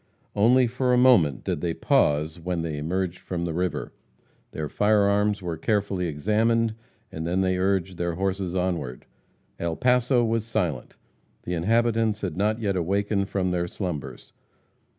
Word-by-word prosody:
Only 125 +5 +5
for 125 +1 0
a - - +4
moment 105 - +4
did - - -2
they 85 -2 -1
pause 75 +3 +1
when 85 0 -3
they 80 -3 -3
emerged 90 +3 -2
from 85 -2 -4
the 85 - -3
river. 90 +2 -2 0.6
Their 75 -1 -4
fire 105 +5 +2
arms 100 0 +1
were 85 -2 -3
carefully 100 -1 0
examined, 110 +8 +1 0.4
and 80 +1 -5
then 90 +2 +1
they 95 -1 +1
urged 95 -1 0
their 85 -1 -2
horses 95 0 -2
onward. 85 -9 -2 0.5
El 85 -1 -2
Paso 125 - +3
was 115 -1 0
silent. 90 - -3 0.5
The 90 - -4
inhabitants 110 +4 +1
had 90 -6 -3
not 105 +4 0
yet 100 -4 -1
awakened 100 +3 0
from 95 -2 -1
their 90 -1 -1
slumbers. 85 -6 -6
95 Hz, 155 wpm, -25 LUFS, 85-110 Hz, 0.6 s, Only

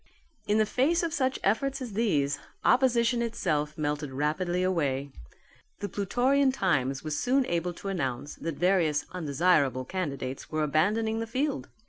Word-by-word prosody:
In 210 +1 +3
the 215 - +4
face 295 +10 +1
of 330 -2 -1
such 265 -4 0
efforts 270 +7 +1
as 245 -5 -6
these, 150 -11 +1 0.3
opposition 240 -2 +3
itself 155 -10 -1
melted 150 -1 -2
rapidly 175 +6 0
away. 140 -7 0 0.7
The 205 - -4
Plutorian 260 +7 +2
Times 135 - 0
was 155 -1 -2
soon 255 +2 +2
able 175 -2 -1
to 195 - -8
announce 145 -7 -2
that 165 -2 -4
various 175 -4 +2
undesirable 145 -5 +1
candidates 140 -7 -4
were 155 -1 0
abandoning 210 +9 +1
the 225 - -3
field. 270 +5 -2
185 Hz, 145 wpm, -28 LUFS, 150-235 Hz, 0.7 s, the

